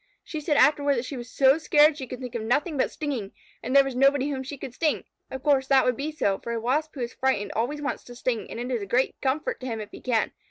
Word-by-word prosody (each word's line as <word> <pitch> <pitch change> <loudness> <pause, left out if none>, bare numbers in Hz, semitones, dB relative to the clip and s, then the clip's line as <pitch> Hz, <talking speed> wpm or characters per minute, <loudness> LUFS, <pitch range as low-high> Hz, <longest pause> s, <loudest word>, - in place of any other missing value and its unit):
She 310 -2 -6
said 295 -1 +1
afterward 285 -1 +4
that 240 0 -2
she 275 - -6
was 245 -1 -7
so 270 +3 +4
scared 300 -1 +5
she 265 -3 -7
could 250 - -7
think 250 -2 -7
of 235 - -3
nothing 280 +8 0
but 265 - +1
stinging, 270 -10 -4 0.3
and 255 +4 -3
there 275 - +8
was 270 -1 -4
nobody 275 +2 +3
whom 265 -2 -3
she 275 +2 -7
could 250 - -7
sting. 310 +3 0 0.3
Of 265 0 -7
course, 275 -3 +3
that 270 -1 +5
would 250 - +2
be 285 +4 -3
so, 200 -11 0
for 235 - -5
a 230 - -1
Wasp 295 +7 -1
who 265 - -5
is 240 0 -3
frightened 260 -6 0
always 285 +7 -1
wants 285 - -3
to 245 - -11
sting, 240 -2 -2
and - - -6
it 245 +2 -4
is 235 - -1
a 200 - -5
great 250 +6 +2
comfort 305 - -1
to 255 - -6
him 225 -3 -3
if 210 -1 -7
he - - -11
can. 235 -4 +1
265 Hz, 285 wpm, -26 LUFS, 240-290 Hz, 0.3 s, there